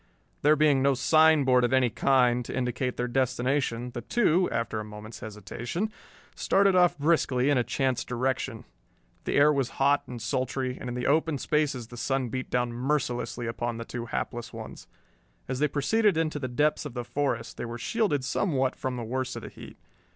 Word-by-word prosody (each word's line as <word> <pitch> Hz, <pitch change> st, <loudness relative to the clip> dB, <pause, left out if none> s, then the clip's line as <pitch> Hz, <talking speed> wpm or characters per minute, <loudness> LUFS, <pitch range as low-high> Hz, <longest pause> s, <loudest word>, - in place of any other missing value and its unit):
There 150 Hz, +2 st, +5 dB
being 150 Hz, -3 st, +3 dB
no 140 Hz, 0 st, +3 dB
signboard 140 Hz, -2 st, +4 dB
of 120 Hz, -, +1 dB
any 130 Hz, -3 st, +3 dB
kind 125 Hz, +1 st, +3 dB
to -, -, -5 dB
indicate 125 Hz, 0 st, -2 dB
their 125 Hz, -, -1 dB
destination, 125 Hz, -1 st, 0 dB
the 120 Hz, -, -5 dB
two, 180 Hz, -, +2 dB
after 115 Hz, -1 st, -2 dB
a -, -, -4 dB
moment's 105 Hz, +1 st, -10 dB
hesitation, 120 Hz, -, -5 dB, 0.4 s
started 195 Hz, 0 st, +3 dB
off 180 Hz, -3 st, +4 dB
briskly 145 Hz, -3 st, +2 dB
in 140 Hz, -, +3 dB
a -, -, +2 dB
chance 130 Hz, +2 st, -1 dB
direction. 125 Hz, -1 st, -2 dB, 0.6 s
The -, -, -1 dB
air 150 Hz, +2 st, +6 dB
was 135 Hz, -2 st, -2 dB
hot 140 Hz, +1 st, +2 dB
and 120 Hz, -1 st, -7 dB
sultry, 130 Hz, +2 st, -2 dB
and 125 Hz, -, -5 dB
in 120 Hz, -, -4 dB
the 125 Hz, -, -3 dB
open 160 Hz, +1 st, +2 dB
spaces 140 Hz, -5 st, -1 dB
the 120 Hz, -, -10 dB
sun 135 Hz, 0 st, -1 dB
beat 130 Hz, +2 st, -4 dB
down 125 Hz, -1 st, 0 dB
mercilessly 125 Hz, -2 st, -2 dB
upon 120 Hz, 0 st, -3 dB
the 115 Hz, -, -6 dB
two 120 Hz, 0 st, -6 dB
hapless 120 Hz, 0 st, -4 dB
ones. 110 Hz, -1 st, -9 dB, 0.6 s
As 130 Hz, -1 st, -3 dB
they 150 Hz, -, +3 dB
proceeded 190 Hz, +7 st, +2 dB
into 155 Hz, -2 st, 0 dB
the 130 Hz, -, -3 dB
depths 150 Hz, +5 st, +1 dB
of 145 Hz, -4 st, -8 dB
the 120 Hz, -, -3 dB
forest 135 Hz, -4 st, -2 dB
they -, -, -4 dB
were 120 Hz, 0 st, -6 dB
shielded 145 Hz, -, 0 dB
somewhat 135 Hz, -3 st, 0 dB
from 130 Hz, -1 st, -3 dB
the 120 Hz, -, -4 dB
worst 130 Hz, +3 st, -3 dB
of -, -, -7 dB
the -, -, -7 dB
heat. -, -, -12 dB
130 Hz, 190 wpm, -27 LUFS, 120-145 Hz, 0.6 s, air